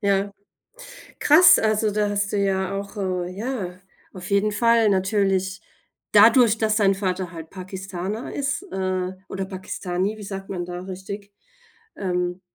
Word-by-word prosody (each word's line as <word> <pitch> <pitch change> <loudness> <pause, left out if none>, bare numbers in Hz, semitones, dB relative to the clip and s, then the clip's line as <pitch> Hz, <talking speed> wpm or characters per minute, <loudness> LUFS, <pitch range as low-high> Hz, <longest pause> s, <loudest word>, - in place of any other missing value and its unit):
Ja. 200 -1 +1 0.9
Krass, 335 +5 +7
also, 215 0 +1
da 210 0 0
hast 200 0 -1
du - - 0
ja 195 -1 0
auch, 200 +1 -8
äh, 185 -3 -2
ja 195 -3 -4 0.3
auf 185 +1 -9
jeden 200 +1 +2
Fall 230 +1 +4
natürlich, 190 -1 +1 0.5
dadurch, 225 +1 +6
dass 215 -1 +1
dein 200 -3 +4
Vater 185 -2 -2
halt 165 -2 -8
Pakistaner 190 +3 -6
ist, 280 +5 -2
äh, 185 -1 -2 0.2
oder 195 0 -4
Pakistani, 190 +1 -3
wie - - -9
sagt 195 -1 -7
man 180 -2 -3
da 175 0 -6
richtig? 195 +2 -8 0.6
Ähm, 180 -1 -2
195 Hz, 145 wpm, -23 LUFS, 185-210 Hz, 0.9 s, Krass